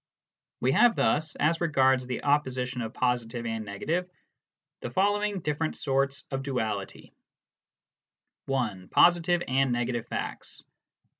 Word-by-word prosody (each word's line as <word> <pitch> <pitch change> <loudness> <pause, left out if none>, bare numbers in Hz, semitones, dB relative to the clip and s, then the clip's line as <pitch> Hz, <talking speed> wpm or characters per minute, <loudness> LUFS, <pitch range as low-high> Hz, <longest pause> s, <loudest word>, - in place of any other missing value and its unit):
We 130 - +2
have 235 - +5
thus, 155 +1 +1
as 165 +3 +1
regards 130 -5 +3
the 125 -2 -4
opposition 130 -3 0
of 110 -1 -4
positive 120 -1 -1
and 110 -1 -3
negative, 160 - -3 0.7
the - - -5
following 205 0 +1
different 150 +1 -2
sorts 135 0 0
of 135 0 -2
duality: 110 -8 -4 1.3
(1) 110 -9 -2
Positive 175 0 +4
and 135 0 +2
negative 120 -1 -1
facts. - - -6
135 Hz, 120 wpm, -28 LUFS, 120-160 Hz, 1.3 s, have